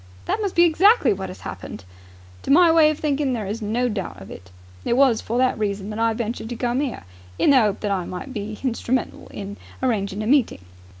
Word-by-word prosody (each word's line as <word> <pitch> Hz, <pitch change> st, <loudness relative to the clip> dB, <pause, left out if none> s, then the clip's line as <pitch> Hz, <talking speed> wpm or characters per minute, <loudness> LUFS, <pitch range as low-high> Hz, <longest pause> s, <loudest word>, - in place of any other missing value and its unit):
"That 435 Hz, -, -1 dB
must 400 Hz, -3 st, -2 dB
be 345 Hz, -, +6 dB
exactly 350 Hz, -, +4 dB
what 190 Hz, -1 st, -6 dB
has 185 Hz, -, -10 dB
happened." 95 Hz, -, -8 dB, 0.6 s
"To -, -, -8 dB
my 335 Hz, +3 st, +6 dB
way 320 Hz, -2 st, +6 dB
of 305 Hz, -, -2 dB
thinking 285 Hz, -3 st, 0 dB
there 220 Hz, -4 st, -3 dB
is 210 Hz, +4 st, -4 dB
no 230 Hz, +4 st, 0 dB
doubt 195 Hz, -, -4 dB
of 95 Hz, -, -11 dB
it. 90 Hz, 0 st, -11 dB, 0.3 s
It 235 Hz, -, 0 dB
was 260 Hz, -5 st, +4 dB
for 235 Hz, -, -3 dB
that 255 Hz, -3 st, +2 dB
reason 205 Hz, -1 st, -2 dB
that 210 Hz, -, -5 dB
I 230 Hz, 0 st, +2 dB
ventured 225 Hz, 0 st, -4 dB
to 240 Hz, -, -4 dB
come 245 Hz, +2 st, -1 dB
'ere. 275 Hz, -4 st, -4 dB, 0.3 s
In -, -, +4 dB
the 260 Hz, -4 st, +6 dB
'ope 205 Hz, -1 st, -2 dB
that 205 Hz, -, -1 dB
I 185 Hz, -3 st, -1 dB
might 185 Hz, +11 st, -7 dB
be 210 Hz, -1 st, -5 dB
hinstrumental 250 Hz, +1 st, -2 dB
in 200 Hz, 0 st, -7 dB, 0.3 s
arranging 210 Hz, -4 st, -1 dB
a -, -, -4 dB
meeting." 245 Hz, -, +1 dB
230 Hz, 225 wpm, -22 LUFS, 205-275 Hz, 0.6 s, be